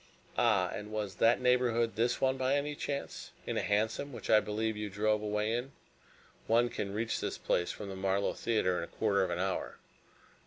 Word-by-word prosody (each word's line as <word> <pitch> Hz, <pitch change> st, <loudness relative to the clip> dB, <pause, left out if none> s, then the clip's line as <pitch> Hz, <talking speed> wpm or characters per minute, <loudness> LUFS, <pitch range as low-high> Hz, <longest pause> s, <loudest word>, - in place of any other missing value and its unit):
"Ah, 105 Hz, -7 st, +3 dB
and 105 Hz, +1 st, -6 dB
was 105 Hz, -3 st, -3 dB
that 115 Hz, +1 st, +4 dB
neighborhood 125 Hz, -2 st, +2 dB
this 120 Hz, +2 st, +1 dB
one, 130 Hz, 0 st, +2 dB
by 130 Hz, +1 st, +1 dB
any 145 Hz, +1 st, -1 dB
chance? 140 Hz, -1 st, -4 dB, 0.2 s
In -, -, -2 dB
a -, -, +1 dB
hansom 110 Hz, +7 st, 0 dB
which 125 Hz, -, -4 dB
I 110 Hz, -, +8 dB
believe 110 Hz, +1 st, -2 dB
you 105 Hz, 0 st, -4 dB
drove 105 Hz, +2 st, +1 dB
away 105 Hz, +1 st, 0 dB
in 125 Hz, +3 st, -3 dB, 0.7 s
one 120 Hz, +2 st, +4 dB
can 100 Hz, -3 st, -4 dB
reach 110 Hz, +2 st, -1 dB
this -, -, -3 dB
place 90 Hz, -, 0 dB
from 105 Hz, -, -7 dB
the 95 Hz, -, -6 dB
Marlow 95 Hz, +1 st, 0 dB
Theatre 90 Hz, -6 st, +1 dB
in -, -, -3 dB
a -, -, -6 dB
quarter 100 Hz, -3 st, +1 dB
of 95 Hz, -, -1 dB
an -, -, -1 dB
hour." 95 Hz, +1 st, -2 dB
110 Hz, 200 wpm, -32 LUFS, 100-120 Hz, 0.7 s, I